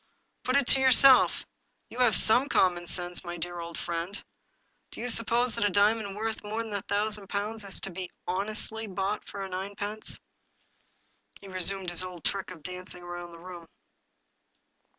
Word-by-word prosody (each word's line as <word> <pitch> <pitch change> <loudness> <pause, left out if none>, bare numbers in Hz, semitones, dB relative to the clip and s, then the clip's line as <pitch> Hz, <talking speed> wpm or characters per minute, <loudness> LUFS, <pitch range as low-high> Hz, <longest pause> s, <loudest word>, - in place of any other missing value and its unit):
Put 255 - +1
it 280 -1 +4
to 270 - +6
yourself, 260 0 +6 0.5
you 245 - -8
have 245 -3 +5
some 250 +6 +4
common 175 -6 +2
sense, 175 0 -2
my 175 0 -5
deaf 175 +1 -4
old 170 0 -7
friend! 170 +5 -3 0.4
— - - -44
do - - -9
you 245 - -3
suppose 235 +2 +2
that - - -1
a 205 - +3
diamond 205 0 +2
worth 220 +1 -3
more 215 +2 -3
than 220 -2 -7
a 200 - -1
thousand 205 0 -1
pounds 210 +2 -2
is 195 -1 -1
to 195 - -4
be 180 0 -6 0.2
honestly 215 +3 -1
bought 195 +1 -2
for 195 -1 -5
ninepence? 200 +3 -2
"^ - - -26 1.2
He 200 - -12
resumed 185 0 0
his 175 - +4
old 180 -2 -7
trick 195 -1 -2
of 175 -5 -11
dancing 180 +1 -6
about 175 0 -7
the 170 - -12
room. 175 -1 -10
195 Hz, 175 wpm, -28 LUFS, 180-220 Hz, 1.2 s, to